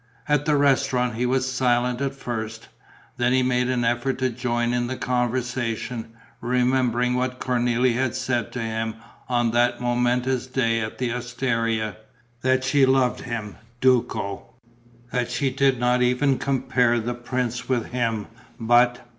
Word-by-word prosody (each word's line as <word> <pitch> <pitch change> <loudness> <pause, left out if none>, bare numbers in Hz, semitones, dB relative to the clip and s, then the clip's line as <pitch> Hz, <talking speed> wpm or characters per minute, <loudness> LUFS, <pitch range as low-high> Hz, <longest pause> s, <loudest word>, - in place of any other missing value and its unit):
At 150 -1 +2
the 150 -2 +3
restaurant 135 -3 +2
he 120 +2 -1
was 130 +1 0
silent 125 0 +1
at 135 0 -2
first. 110 -4 -5 0.5
Then 120 +1 +2
he 130 0 +3
made 125 0 +1
an 125 -2 0
effort 120 +3 0
to 130 -1 0
join 120 0 -1
in 120 0 0
the 130 +1 -4
conversation, 120 -2 -2 0.3
remembering 125 0 +1
what 125 0 -1
Cornélie 125 0 +1
had 130 0 -1
said 130 -4 -1
to 125 - -3
him 110 0 -3 0.3
on 120 -2 +2
that 120 +1 +2
momentous 125 +1 0
day 115 -3 +1
at 110 -1 -4
the 125 -2 -1
osteria: 115 -3 -1 0.4
that 130 +1 +2
she 140 +1 +3
loved 130 -1 +3
him, 110 -5 -5 0.2
Duco; 120 -6 +1 0.6
that 125 -1 -1
she 130 +2 0
did 135 -1 +2
not 125 0 +2
even 125 +2 +2
compare 125 -3 +1
the 120 +2 -2
prince 120 0 -3
with 125 -3 -1
him; 115 -4 -1 0.3
but 120 +1 +3
125 Hz, 150 wpm, -24 LUFS, 120-130 Hz, 0.6 s, the